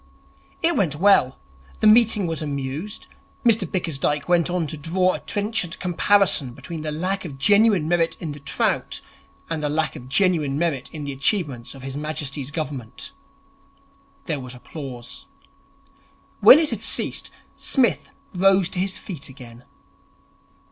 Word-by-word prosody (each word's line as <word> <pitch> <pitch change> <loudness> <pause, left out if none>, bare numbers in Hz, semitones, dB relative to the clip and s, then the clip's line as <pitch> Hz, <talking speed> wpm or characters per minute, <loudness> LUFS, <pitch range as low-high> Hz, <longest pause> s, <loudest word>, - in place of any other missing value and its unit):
It 335 0 +6
went 180 - +1
well. 170 -7 +4 0.4
The - - 0
meeting 215 -2 +5
was 165 -1 -3
amused. 145 +7 -4 0.4
Mr 215 -7 +3
Bickersdyke 150 -5 -1
went 175 -1 +2
on 175 -2 0
to 155 - -5
draw 180 +5 +1
a - - -4
trenchant 205 -4 -1
comparison 180 -7 +2
between 165 -3 -7
the 155 0 -3
lack 185 +5 -2
of 145 -6 -8
genuine 200 +1 +4
merit 170 -1 +1
in 160 -4 -5
the 145 - -8
trout 140 - -1 0.5
and 165 -2 -3
the 150 - 0
lack 155 +2 -1
of 125 +1 -10
genuine 155 -4 +2
merit 160 -5 -1
in 155 -2 -7
the 140 - -4
achievements 140 - -1
of 135 - -12
His 135 0 -5
Majesty's 145 -2 -3
Government. 145 - -5 1.1
There 155 -5 -2
was 125 -1 -8
applause. 125 -2 -8 1.1
When 225 +7 +10
it 315 -3 +1
had 220 -3 -3
ceased, - - 0 0.3
Psmith 235 - +1 0.2
rose 190 0 +3
to 185 - -5
his 185 0 -1
feet 160 -9 -7
again. 125 -2 -13
165 Hz, 150 wpm, -23 LUFS, 140-190 Hz, 1.1 s, When